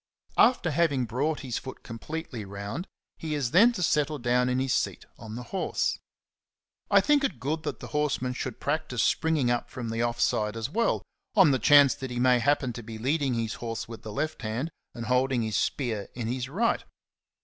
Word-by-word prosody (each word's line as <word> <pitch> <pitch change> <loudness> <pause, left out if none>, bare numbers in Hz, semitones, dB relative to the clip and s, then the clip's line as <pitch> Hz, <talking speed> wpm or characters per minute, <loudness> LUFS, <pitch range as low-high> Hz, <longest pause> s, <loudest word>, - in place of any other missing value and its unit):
After 240 -9 +4
having 145 -5 +2
brought 140 +7 -1
his 130 -5 -3
foot 130 - -9
completely 125 0 -6
round, 100 - -6 0.3
he 155 -2 -3
is 135 -5 -1
then 220 +7 +7
to 180 - -2
settle 150 -1 +1
down 125 0 +2
in 125 - +1
his 130 -1 +1
seat - - -1
on 110 -1 -8
the 125 - -5
horse. 190 - 0 0.9
I - - +6
think 295 -1 +3
it 180 - -1
good 150 +6 -2
that - - -5
the - - -7
horseman 145 -4 0
should 125 -1 -5
practise 145 -6 -1
springing 155 -7 +2
up 120 - -1
from 120 -3 -5
the 115 +1 -1
off 120 0 -1
side 105 +1 +1
as 115 +4 -3
well, 230 +5 +1 0.3
on 190 -8 +7
the 130 - +2
chance 145 +3 +7
that 130 - -6
he 120 0 -3
may 125 0 +4
happen 135 -1 +1
to 120 - -7
be 110 0 -8
leading 135 +2 0
his 115 -2 -1
horse 115 -1 -4
with 115 -2 -9
the 110 - -7
left 155 +6 -3
hand 115 +9 -3 0.2
and 115 - -5
holding 125 0 +2
his 110 -2 -2
spear 115 -8 -1
in 120 -2 -4
his 125 +2 -3
right. 225 +10 +1
130 Hz, 205 wpm, -28 LUFS, 115-150 Hz, 0.9 s, then